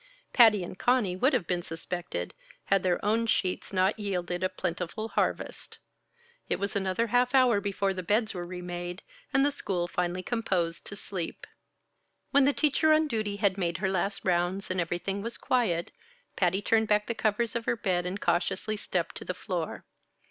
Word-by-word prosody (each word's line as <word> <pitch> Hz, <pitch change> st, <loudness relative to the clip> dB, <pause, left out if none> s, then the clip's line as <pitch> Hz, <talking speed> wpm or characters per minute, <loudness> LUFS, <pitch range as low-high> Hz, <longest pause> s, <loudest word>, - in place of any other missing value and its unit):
Patty 220 Hz, -6 st, +7 dB
and 180 Hz, -, -8 dB
Conny 245 Hz, -8 st, +2 dB
would 255 Hz, +10 st, +3 dB
have 245 Hz, -, +1 dB
been 180 Hz, 0 st, -1 dB
suspected, 165 Hz, -, -4 dB, 0.3 s
had 195 Hz, -1 st, +3 dB
their 180 Hz, 0 st, 0 dB
own 225 Hz, +2 st, +2 dB
sheets 185 Hz, -4 st, 0 dB
not 190 Hz, +3 st, +2 dB
yielded 180 Hz, -3 st, -2 dB
a 185 Hz, -, +2 dB
plentiful 180 Hz, +7 st, -3 dB
harvest. -, -, -2 dB, 0.7 s
It -, -, +2 dB
was 200 Hz, 0 st, -3 dB
another 195 Hz, +3 st, +1 dB
half 245 Hz, +3 st, +2 dB
hour 245 Hz, -6 st, +5 dB
before 200 Hz, -1 st, 0 dB
the 185 Hz, -, -4 dB
beds 215 Hz, +5 st, +1 dB
were 175 Hz, -2 st, -4 dB
remade, 175 Hz, 0 st, -6 dB, 0.3 s
and 270 Hz, +1 st, +4 dB
the 290 Hz, -, +3 dB
school 180 Hz, -10 st, -2 dB
finally 180 Hz, +1 st, -2 dB
composed 185 Hz, -8 st, -1 dB
to 205 Hz, -, -6 dB
sleep. 190 Hz, -4 st, -5 dB, 0.9 s
When 280 Hz, -1 st, +5 dB
the 285 Hz, -, +5 dB
teacher 305 Hz, +2 st, +3 dB
on 310 Hz, 0 st, +4 dB
duty 215 Hz, -6 st, -1 dB
had 200 Hz, -1 st, +1 dB
made 170 Hz, -2 st, 0 dB
her 190 Hz, 0 st, 0 dB
last 195 Hz, +2 st, -1 dB
rounds, 180 Hz, +2 st, 0 dB
and 185 Hz, -1 st, +1 dB
everything 175 Hz, +4 st, -2 dB
was 230 Hz, +3 st, -4 dB
quiet, 190 Hz, -10 st, 0 dB, 0.4 s
Patty 185 Hz, +2 st, +1 dB
turned 220 Hz, +1 st, +3 dB
back 210 Hz, 0 st, +3 dB
the 235 Hz, -, -2 dB
covers 225 Hz, +2 st, 0 dB
of 235 Hz, -1 st, -2 dB
her 235 Hz, -, +1 dB
bed 180 Hz, -5 st, 0 dB
and 190 Hz, +3 st, -4 dB
cautiously 185 Hz, +5 st, 0 dB
stepped 180 Hz, -4 st, -2 dB
to -, -, -5 dB
the 180 Hz, -, -4 dB
floor. 180 Hz, -4 st, -4 dB
195 Hz, 180 wpm, -29 LUFS, 180-225 Hz, 0.9 s, Patty